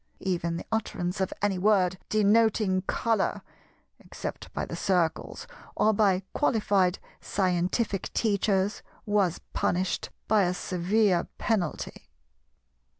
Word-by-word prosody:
Even 170 -3 -1
the - - -7
utterance 195 -4 -2
of 190 - 0
any 195 -3 +1
word 185 -2 +3
denoting 215 -2 +3
Colour, 225 -4 0 0.6
except - - -7
by - - -3
the - - -6
Circles 175 -4 -1 0.3
or 220 - +3
by 195 -3 +2
qualified 200 -8 +2 0.2
scientific 185 +2 -1
teachers, 200 -2 +1 0.2
was 200 -5 +1
punished 180 +1 0 0.2
by 215 -1 +4
a 180 +1 0
severe 185 +1 +1
penalty. 195 -9 -2
195 Hz, 105 wpm, -27 LUFS, 180-215 Hz, 0.6 s, by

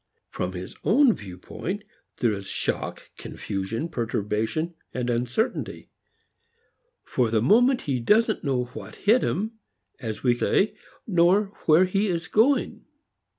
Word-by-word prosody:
From 90 +1 -3
his 90 0 -7
own 245 +2 +5
standpoint, 100 - -6 0.4
there 120 - +3
is 100 -1 -5
shock, - - -3
confusion, 100 - -4
perturbation, 115 +4 -2 0.2
uncertainty. 125 - -2 1.1
For 125 -3 0
the 110 0 +2
moment 245 - +4
he 135 -3 -1
doesn't 220 - +2
know 130 -4 +1
what - - -9
hit 225 +5 +3
him, 220 +4 -2 0.4
as 110 -5 -5
we 125 -2 +4
say, 195 - +1 0.3
nor 195 +2 +3
where 160 +4 +6
he 195 +3 0
is 170 -3 -2
going. 255 +8 +2
160 Hz, 120 wpm, -25 LUFS, -, 1.1 s, where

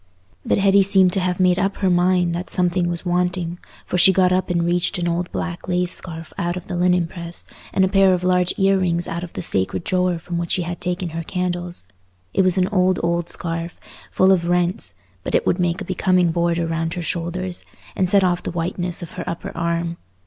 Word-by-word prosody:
But - - +1
Hetty 200 0 +5
seemed 190 -2 +4
to 195 - +1
have 180 0 -1
made 185 0 +3
up 195 +1 0
her 190 - +1
mind 175 -1 +2
that 175 +2 -4
something 180 -1 +1
was 170 +1 -3
wanting, 175 -1 -1 0.3
for 180 - -1
she 190 - +8
got 185 -1 +3
up 185 +1 +1
and 170 -1 +1
reached 175 +2 +1
an 175 -1 -1
old 170 +1 -1
black 175 0 -4
lace 180 0 0
scarf 165 -2 -6
out 175 -1 -1
of 180 - -7
the - - -5
linen 180 0 +2
press, 170 0 -6 0.3
and 190 - +3
a - - +1
pair 195 0 +4
of 180 - -5
large 180 0 +2
ear 195 0 +3
rings 175 -2 0
out 170 +1 -4
of 175 - -8
the - - -4
sacred 95 - 0
drawer 180 -1 +1
from 170 +1 -4
which 170 -1 -1
she 180 - +1
had 175 +1 -5
taken 180 0 -2
her 165 +1 -4
candles. 175 - -3 0.5
It - - +3
was 185 0 +2
an 185 -1 +3
old 185 -3 +2
old 170 0 0
scarf, 170 0 -4 0.3
full 190 +1 +4
of 175 -3 +2
rents, 175 - 0 0.3
but - - -1
it - - +2
would 180 - +1
make 175 -1 0
a - - -4
becoming 185 -1 +2
border 170 0 0
round 165 +1 -2
her 175 - -4
shoulders, 175 +2 -3 0.3
and 185 -1 +1
set 200 0 +4
off 180 -1 +1
the - - -4
whiteness 175 +1 -3
of 170 - -9
her - - -5
upper 170 - -6
arm. 170 0 -1
175 Hz, 225 wpm, -21 LUFS, 170-185 Hz, 0.5 s, she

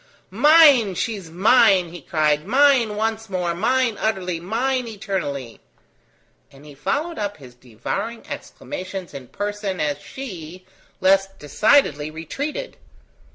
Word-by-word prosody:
"Mine! 270 - +6
She 225 - -1
is 185 -5 -10
mine!" 195 0 +4
he 175 0 -10
cried: 150 +1 0
"mine 260 -3 +4
once 220 0 -2
more! 180 -3 -1
mine 230 +4 +1
utterly! 185 -6 -1
mine 245 +7 -1
eternally!" 180 - -5 0.9
and 140 +2 -17
he 150 - -12
followed 300 - -3
up 205 -1 -3
his 130 -4 -14
devouring 125 - -6
exclamations 185 - -7
in 135 -3 -9
person 205 - -4
as 145 -1 -1
she, 185 - -9 0.4
less 195 +1 +4
decidedly, 155 - +1
retreated. 280 - -5
195 Hz, 120 wpm, -22 LUFS, 160-230 Hz, 0.9 s, Mine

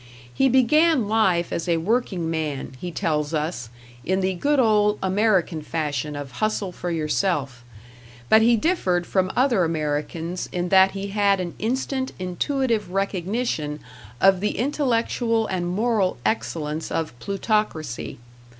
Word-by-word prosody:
He 270 - +3
began 265 +1 +4
life 195 -6 +2
as 170 +1 -3
a 170 - +3
working 190 -2 -1
man, 150 -5 -3
he 180 - -4
tells 150 -2 -1
us, 150 -6 -3 0.3
in 190 +2 0
the 190 0 0
good 285 +11 +1
old 210 -3 +3
American 190 -4 +1
fashion 150 -2 -3
of 145 -2 -6
hustle 205 +5 -1
for 175 0 -5
yourself; 150 -5 -1 0.6
but 220 - +6
he 235 +1 +5
differed 190 - +1
from 190 0 0
other 245 -7 +3
Americans 160 +2 -2
in 180 0 -2
that 190 0 +5
he 195 0 -4
had 200 -1 +2
an 175 -2 -4
instant, 260 +3 -2
intuitive 225 +5 -1
recognition 190 -4 -2 0.4
of 190 -1 +5
the 210 +2 -1
intellectual 235 -3 0
and 180 -4 -2
moral 210 0 +1
excellence 150 +8 -2
of 160 -5 -2
Plutocracy. 195 - -2
190 Hz, 135 wpm, -23 LUFS, 160-220 Hz, 0.6 s, but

